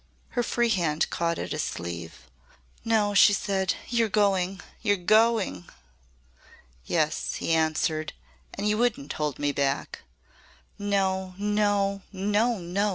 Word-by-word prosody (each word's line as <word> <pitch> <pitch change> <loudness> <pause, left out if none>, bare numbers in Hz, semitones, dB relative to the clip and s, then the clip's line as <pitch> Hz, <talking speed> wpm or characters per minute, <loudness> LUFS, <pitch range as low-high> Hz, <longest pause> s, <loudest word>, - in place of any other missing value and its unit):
Her 245 - -1
free 240 0 +1
hand 165 -7 +1
caught 170 -1 -1
at - - -5
his - - -1
sleeve. 85 -1 -6 0.6
"No," 215 -2 +2
she 205 +1 +7
said. 190 -2 0
"You're 235 -2 +1
going 195 -2 +1 0.2
you're 205 -1 +2
going!" 215 - +2 1.1
"Yes," - - -1
he 165 - -1
answered. 155 -1 0 0.4
"And 200 +1 -2
you 210 +1 +1
wouldn't 245 +3 0
hold 150 -2 -2
me 145 0 0
back." 140 0 -2 0.8
"No! 190 -2 0
No! 205 -1 +1
No! 210 +4 +1
No!" 190 +3 -1
195 Hz, 125 wpm, -26 LUFS, 165-210 Hz, 1.1 s, she